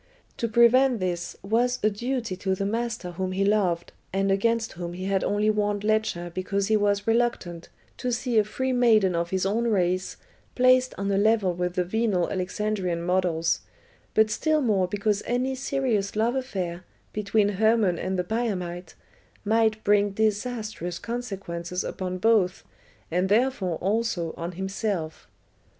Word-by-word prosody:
To 230 - -1
prevent 235 +2 +4
this 175 -2 -3
was 240 +5 +1
a 215 - +4
duty 235 -1 -3
to 190 0 -1
the 195 - -2
master 225 -3 -2
whom 185 +2 -3
he 195 +1 +1
loved, 190 -5 +1 0.2
and 195 +1 +1
against 225 +3 +1
whom 175 0 -6
he 185 +1 -6
had 195 -1 +1
only 210 +1 +2
warned 205 -1 -1
Ledscha 210 -5 0
because 195 +2 -1
he 220 - +4
was 205 -1 +1
reluctant 225 -7 0 0.3
to 250 - -2
see 240 -1 +1
a - - +4
free 260 +5 -2
maiden 220 -6 +4
of 170 0 -1
his 190 0 0
own 220 +4 0
race 185 -4 0 0.4
placed 255 0 +4
on 200 0 -1
a 195 - +2
level 215 -3 +3
with 180 0 -2
the 180 - +2
venal 195 -1 0
Alexandrian 185 -2 -2
models, 175 -2 +1 0.6
but 220 0 +4
still 310 +6 +1
more 205 -7 +2
because 205 +2 0
any 250 +2 0
serious 255 -7 -1
love 225 +3 +1
affair 185 -9 -3 0.3
between 210 0 +1
Hermon 210 -3 +2
and 190 +1 -2
the 180 - 0
Biamite 180 -5 -3 0.5
might 220 0 +2
bring 205 -1 +3
disastrous 215 -4 -2
consequences 185 -6 -4
upon 185 -1 -4
both, 195 -3 +2 0.5
and 180 +3 +1
therefore 215 -5 +1
also 200 -4 -1
on 170 +2 -5
himself. 190 -3 -3
205 Hz, 155 wpm, -26 LUFS, 185-225 Hz, 0.6 s, prevent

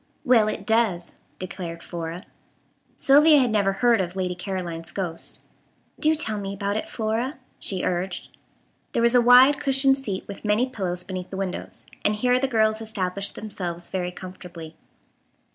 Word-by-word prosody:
"Well, 235 -4 +5
it - - -3
does," 220 -7 +1 0.2
declared 175 -2 -6
Flora. 170 +1 -6 0.7
Sylvia 295 +3 +6
had 250 -4 +3
never 200 -2 +2
heard 235 +1 +3
of 180 0 -4
Lady 185 -1 -1
Caroline's 180 -3 -5
ghost. 175 -4 -4 0.6
"Do 310 +1 +4
tell 220 -9 -1
me 200 0 -4
about 200 +1 -2
it, 215 - -3
Flora," 230 +5 -2 0.2
she 190 -2 -2
urged. 180 0 -3 0.6
There 230 - +1
was 235 +1 +4
a 245 - +6
wide 250 +4 +7
cushioned 270 -1 +3
seat 200 -8 -4
with 200 - -9
many 210 +3 +2
pillows 185 -8 -3
beneath 185 0 -6
the 190 - -6
windows, 190 -2 -5 0.2
and 210 - +2
here 250 +3 +2
the 270 - +1
girls 220 -3 +2
established 200 -3 -3
themselves 175 -5 -5
very 180 -2 -2
comfortably. 180 -3 -10
200 Hz, 160 wpm, -24 LUFS, 180-235 Hz, 0.7 s, wide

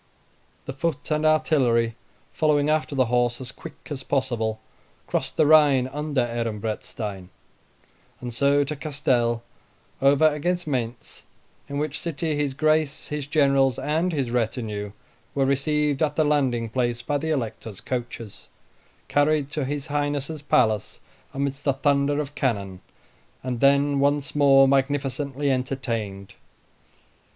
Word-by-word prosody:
The 135 - -5
foot 145 +1 -3
and 155 +1 +2
artillery, 125 -7 +2 0.4
following 150 -1 +2
after 155 -1 0
the 130 -1 +3
horse 120 0 +1
as 130 - -7
quick - - -12
as 140 -2 -4
possible, 120 -5 -1 0.5
crossed - - -3
the - - +5
Rhine 145 -4 +5
under 145 0 -1
Ehrenbreitstein, 110 -4 -4 0.9
and 120 -1 -6
so 140 +3 +3
to 145 +2 -4
Castel, 130 -6 0 0.6
over 140 +3 +5
against 175 +4 -1
Mayntz, 125 -5 -4 0.5
in 140 - -3
which 150 0 -2
city 165 -1 -2
his 145 -2 -1
Grace, 155 0 +1
his 150 -2 -4
generals, 140 -4 +3
and 160 +5 0
his 135 -7 -2
retinue 110 -3 -2 0.4
were 135 -1 +2
received 145 +1 +1
at 150 -2 +1
the 155 - +2
landing 130 -6 +1
place 120 0 -1
by 145 +2 -1
the 160 +2 -3
Elector's 115 -7 -3
coaches, 120 -4 -6 0.6
carried 145 -1 +2
to 150 -2 -2
his 145 +1 -3
Highness's 145 0 -2
palace 110 -7 +1 0.3
amidst 140 0 -3
the 140 - +2
thunder 140 +1 +1
of 145 -1 -4
cannon, 100 -9 -2 0.6
and 125 -2 -3
then 140 +1 +3
once 145 0 +1
more 135 -2 +6
magnificently 140 +1 0
entertained. 115 -7 -3
140 Hz, 130 wpm, -24 LUFS, 120-145 Hz, 0.9 s, more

